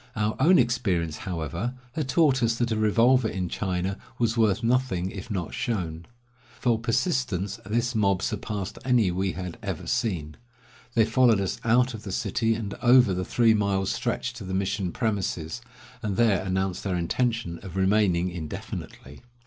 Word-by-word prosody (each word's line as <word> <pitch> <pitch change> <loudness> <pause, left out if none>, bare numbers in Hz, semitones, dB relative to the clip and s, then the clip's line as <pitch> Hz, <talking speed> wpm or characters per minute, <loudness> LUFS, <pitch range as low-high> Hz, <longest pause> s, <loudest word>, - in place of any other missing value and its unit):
Our 105 0 0
own 175 +7 +6
experience, 100 - +1
however, 85 - -3 0.2
had 145 -1 -3
taught 140 -3 +3
us 115 -1 +2
that 120 0 -1
a - - +1
revolver 115 +3 +4
in 90 -4 -3
China 95 0 -2 0.2
was 115 -1 +1
worth 110 -4 +2
nothing 115 -7 +1
if 95 +2 -8
not 95 -6 -3
shown. 85 -7 -3 0.5
For 120 -3 +2
persistence, 115 - -1
this 120 +3 0
mob 100 -4 +1
surpassed 100 -4 -3
any 120 -7 +3
we 95 +2 -1
had 90 -2 -6
ever - - -4
seen. 80 -9 -2 0.6
They 115 -2 +5
followed 115 -1 +4
us 95 -2 -2
out 125 +2 +3
of 110 - -7
the 100 - -7
city 115 +4 0
and 105 -3 -4
over 120 -4 +6
the 90 0 -2
three 115 +3 +3
miles' 100 -2 +1
stretch 125 - -2
to 120 -3 -9
the 95 0 -4
mission 95 -1 -1
premises, 100 -4 -2 0.4
and 105 -5 -2
there 110 -6 +3
announced 95 -1 -1
their 95 -2 -1
intention 110 0 -1
of 95 -2 -9
remaining 95 -2 +2
indefinitely. 75 -4 -7
105 Hz, 165 wpm, -26 LUFS, 95-120 Hz, 0.6 s, own